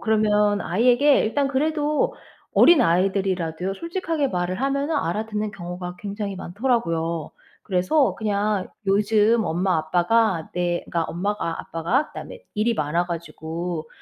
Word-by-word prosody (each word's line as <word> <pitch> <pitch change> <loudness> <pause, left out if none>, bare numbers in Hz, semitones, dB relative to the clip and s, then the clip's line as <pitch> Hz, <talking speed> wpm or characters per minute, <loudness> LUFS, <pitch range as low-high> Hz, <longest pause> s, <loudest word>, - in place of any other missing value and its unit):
그러면 210 -2 +2
아이에게 245 - +4
일단 275 +5 0
그래도 300 +2 0 0.4
어린아이들이라도요 185 - +3
솔직하게 330 - -2
말을 180 +3 -2
하면은 280 +3 0
알아듣는 215 - -2
경우가 180 -2 -7
굉장히 200 -1 -4
많더라고요. 170 - -1 0.3
그래서 195 - +2
그냥 210 -2 -1 0.2
"요즘 210 +3 +3
엄마 180 +3 +1
아빠가 175 +2 +1
내 175 -1 0
그니까 170 - -1
엄마가 180 -1 -2
아빠가 200 - -1
그다음에 - - -9 0.2
일이 225 +2 +1
많아 165 +3 0
가지고 165 0 -5
200 Hz, 335 characters per minute, -23 LUFS, 175-230 Hz, 0.4 s, 아이에게